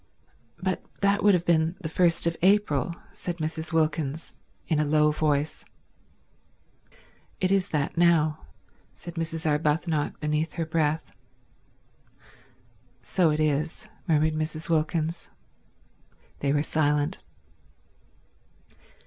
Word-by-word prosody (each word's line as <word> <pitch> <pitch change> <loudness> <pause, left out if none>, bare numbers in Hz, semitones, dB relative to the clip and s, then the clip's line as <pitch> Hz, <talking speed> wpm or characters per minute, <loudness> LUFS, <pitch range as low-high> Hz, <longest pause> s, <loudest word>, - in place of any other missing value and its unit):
"But 185 0 -2 0.2
that 200 0 +2
would 205 -2 +6
have 175 -1 -1
been 165 0 +2
the 165 - -3
first 170 +1 +3
of 170 0 +1
April," 180 -6 +2 0.2
said 175 -1 -5
Mrs. 160 0 -3
Wilkins, 155 -1 -1 0.3
in 155 -3 0
a - - +3
low 150 0 +3
voice. 150 -1 0 1.8
"It 185 0 +1
is 195 -1 +2
that 150 -2 -1
now," 160 -3 +3 0.5
said 175 - -9
Mrs. 165 -1 -4
Arbuthnot 150 0 0
beneath 150 +1 -1
her 165 -1 -2
breath. 160 -1 -1 1.9
"So 180 -4 +2
it 150 0 0
is," 155 +7 -1 0.2
murmured 155 -1 +3
Mrs. 155 +1 -3
Wilkins. 160 +1 -1 1.1
They 140 - 0
were 145 +1 +2
silent. 150 -2 0
160 Hz, 110 wpm, -26 LUFS, 150-170 Hz, 1.9 s, would